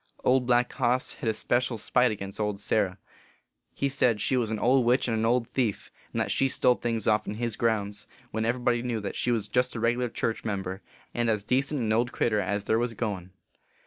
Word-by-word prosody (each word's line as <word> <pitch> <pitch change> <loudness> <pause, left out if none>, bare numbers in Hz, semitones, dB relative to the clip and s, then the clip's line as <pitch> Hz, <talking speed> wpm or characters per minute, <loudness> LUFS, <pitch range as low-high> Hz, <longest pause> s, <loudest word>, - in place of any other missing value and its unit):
Old 125 -1 +3
Black 125 0 +3
Hoss 125 0 +1
hed 115 - -3
a - - +1
special 120 +1 0
spite 125 +4 +2
agin 100 -2 -5
old 105 -2 -1
Sarah. 100 -2 0 0.7
He 140 - -1
said 125 -5 +2
she 130 - +1
was 120 -4 0
an 110 - -2
old 125 +4 +3
witch 125 +3 +2
and 115 - 0
an 110 0 +1
old 120 0 +2
thief, 120 -6 -2 0.2
and - - -2
that - - 0
she 135 - +2
stole 125 - +3
things 115 -3 -2
ofPn 105 -1 +1
his 115 -1 -2
grounds, 105 -3 -1 0.2
when 110 +1 -2
everybody 120 +1 +1
knew 120 -2 -2
that 100 - -5
she - - -1
was 115 -4 +1
a - - -13
regerlar 120 -1 +1
church 115 - -2
member, 95 -2 -3 0.3
and 120 -1 0
as 105 -2 +1
decent 135 +4 0
an 110 -2 +1
old 120 +2 +1
critter 110 -3 +1
as 100 +1 -1
there 110 - +1
was 120 -1 -1
goin 100 -5 -3
115 Hz, 210 wpm, -27 LUFS, 105-125 Hz, 0.7 s, Old